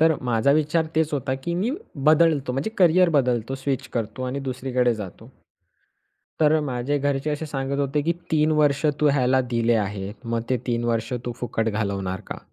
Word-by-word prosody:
तर 160 0 +5
माझा 125 +2 +2
विचार 155 +2 +1
तेच 160 -1 +1
होता 130 -2 -1
की 170 - -1
मी 205 +8 0 0.4
बदलतो. 155 -4 +4
म्हणजे 135 +12 -2
करिअर 180 0 +5
बदलतो 125 0 0
स्विच 135 -1 -3
करतो 115 +2 -3
आणि 130 +2 -3
दुसरीकडे 125 -1 0
जातो. 105 -4 -9 1.1
तर 155 +1 +4
माझे 135 +1 -1
घरचे 140 +1 -1
असे 150 +2 -3
सांगत 140 -1 -3
होते 140 +1 0
की 170 +3 +1 0.2
3 155 0 +3
वर्ष 145 0 +2 0.2
तू 150 - +4
ह्याला 130 -1 +3
दिले 115 0 +2
आहे. 100 -2 -2
मग 115 0 -2
ते 130 - +3
3 120 -1 -1
वर्ष 115 0 -1
तू 120 - -2
फुकट 115 -2 -1
घालवणार 100 -3 -2
का? - - -4
135 Hz, 175 wpm, -24 LUFS, 120-150 Hz, 1.1 s, तर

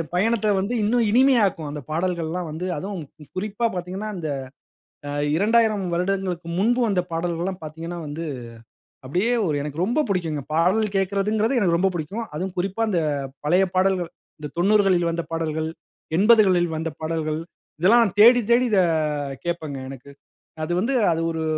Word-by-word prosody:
பயணத்த 215 +2 +2
வந்து 200 +6 -1
இன்னும் 230 +1 +2
இனிமையாக்கும், 225 - +3
அந்த 150 0 -5
பாடல்கள்லாம் 170 0 -2
வந்து. 165 +4 -4
அதுவும் 190 +1 -5 0.3
குறிப்பா 210 +4 -2
பார்த்தீங்கன்னா, 185 +4 -4
இந்த 160 -3 -4 1.1
2000 215 +1 +3
வருடங்களுக்கு 180 -1 -1
முன்பு 240 +5 +2
வந்த 200 -4 +1
பாடல்கள்லாம் 175 +2 -2
பார்த்தீங்கன்னா, 165 +3 -6
வந்து 155 +3 -5 0.8
அப்படியே 180 - 0 0.2
ஒரு 150 -2 0
எனக்கு 150 +3 -3
ரொம்ப 240 +9 +1
பிடிக்குங்க. 160 -6 -1
பாடல் 185 +7 +3
கேக்குறதுங்கிறது 210 +5 +1
எனக்கு 170 -4 +3
ரொம்ப 190 +1 +2
பிடிக்கும். 200 +9 -4
அதுவும் 185 +3 -4
குறிப்பா, 195 +5 -1
இந்த 175 - +1 0.5
பழைய 180 +5 +4
பாடல்கள். 185 -2 +1 0.3
இந்த 150 -1 -7
90 205 +4 +4
களில் 175 -3 +3
வந்த 170 0 -2
பாடல்கள், 160 -1 -2 0.5
80 220 +2 +6
களில் 175 -3 +2
வந்த 160 +1 -3
பாடல்கள், 155 -1 -2 0.4
இதெல்லாம் 230 +7 +6
நான் 200 -1 -3
தேடி, 245 +3 +8
தேடி 250 +1 +4
இத 200 - +4 0.7
கேட்பங்க, 160 -5 -3
எனக்கு. 135 +1 -11 0.5
அது 165 - -3
வந்து, 255 +6 0 0.2
அது 165 - -1
ஒரு 160 - -3
180 Hz, 145 wpm, -23 LUFS, 165-210 Hz, 1.1 s, தேடி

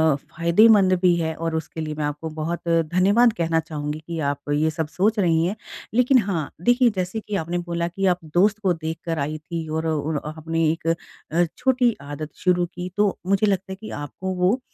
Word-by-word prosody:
फ़ायदेमंद 185 +7 +4
भी 180 -2 +5
है 160 -1 -1
और 165 0 -3
उसके 160 0 -4
लिए 155 -1 -3
मैं 150 0 -2
आपको 150 +2 -4
बहुत 160 +3 -4
धन्यवाद 185 +8 +3
कहना 165 -5 +1
चाहूँगी 150 -1 -4
कि 170 -1 -4
आप 145 +1 -8
ये 155 +2 +2
सब 160 -1 -3
सोच 210 +7 +1
रही 165 -3 +3
हैं। 190 +4 -1 0.4
लेकिन 250 +3 +4
हाँ, 180 -8 -2
देखिए 245 +3 +4
जैसे 185 +4 -2
कि 210 -1 -5
आपने 170 -1 -2
बोला 170 -1 -2
कि 195 +3 -3
आप 180 -2 +3
दोस्त 205 +4 +3
को 190 -4 +2
देख 160 0 -4
कर 165 -2 -2
आईं 150 +2 -2
थी 160 +1 -6
और 160 +1 -2
उन 155 -1 -1
आपने 160 +1 -2
एक 165 0 -5 0.4
अ, 170 +2 +3
छोटी 250 -3 +2
आदत 145 +2 -6
शुरू 180 -1 +3
की 180 +1 -7
तो 205 -2 +2
मुझे 200 +2 +3
लगता 195 -1 -1
है - - -4
कि 220 - -7
आपको 185 +6 -5
वो 185 +8 +2
170 Hz, 205 wpm, -23 LUFS, 160-195 Hz, 0.4 s, भी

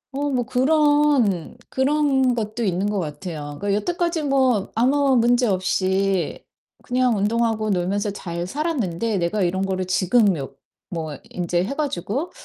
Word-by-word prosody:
어 290 +1 -1
뭐 250 -3 0
그런 270 - +2
그런 265 -2 +2
것도 220 +1 -3
있는 190 -1 0
것 205 -2 -1
같아요. 150 -2 -6
그 200 0 0
여태까지 340 - -1
뭐 260 -7 +2
아무 270 +4 +3
문제 240 +1 +3
없이 190 -1 0 0.4
그냥 250 -2 +1
운동하고 220 +1 0
놀면서 195 +3 0
잘 175 -3 -5
살았는데 230 - -1
'내가 180 +4 -1
이런 190 +2 0
거를 185 -1 -2
지금 185 +5 +3
묘 140 -5 -6 0.4
뭐 160 -4 -4
인제 175 0 -1
해 250 - -3
가지고 275 - -2
215 Hz, 270 characters per minute, -22 LUFS, 185-265 Hz, 0.4 s, 아무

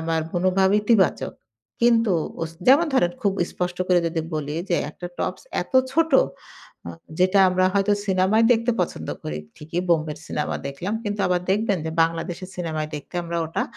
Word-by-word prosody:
আমার 160 0 0
মনোভাব 185 +2 +2
ইতিবাচক। 210 -4 +2 0.5
কিন্তু 230 -3 +4 0.3
অস 160 - -3 0.2
যেমন 290 +6 +6
ধরেন 175 -9 +3
খুব 200 -2 +2 0.2
স্পষ্ট 180 0 -3
করে 180 -1 +5
যদি 165 0 -1
বলি, 150 -1 -3
যে, 175 - +2
একটা 175 - -8
টপস - - -3 0.2
এত - - -17 0.2
ছোট 325 +1 +2 0.8
আ - - -4 0.3
যেটা 185 +2 +4
আমরা 185 0 +2
হয়তো 200 +1 +3
সিনেমায় 195 +4 +3
দেখতে 230 +1 +1
পছন্দ 80 - -3
করি 75 0 -4 0.2
ঠিকই 165 +4 -4
বোম্বের 155 -2 +1
সিনেমা 150 - -2
দেখলাম 170 +10 -4
কিন্তু 205 0 -2
আবার 180 -1 +1
দেখবেন 200 -1 +1
যে, - - -2
বাংলাদেশের 165 +2 -3
সিনেমায় 155 -3 -3
দেখতে 150 +4 -9
আমরা 170 0 -4
ওটা 160 - -2
180 Hz, 165 wpm, -23 LUFS, 165-205 Hz, 0.8 s, যেমন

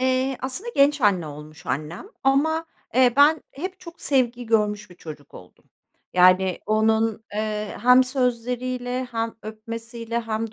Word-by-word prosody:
Eee, 260 +1 +1
aslında 270 - -4
genç 285 +1 +4
anne 195 -7 +2
olmuş 150 +1 -11
annem 155 - -4 0.2
ama, 315 +4 +2 0.3
eee, 250 -1 +5
ben 300 +3 +5
hep 370 +6 -6
çok 335 -2 -12
sevgi 245 -3 0
görmüş 210 -3 0
bir - - -13
çocuk 155 -4 -11
oldum. 90 - -15 0.5
Yani, 185 0 +5
onun, 220 0 +1
eee, 215 -1 -3
hem 250 +1 +7
sözleriyle 250 0 -2
hem 225 -1 -2
öpmesiyle 230 +2 -5
hem 225 -1 -3
230 Hz, 135 wpm, -23 LUFS, 210-260 Hz, 0.5 s, hem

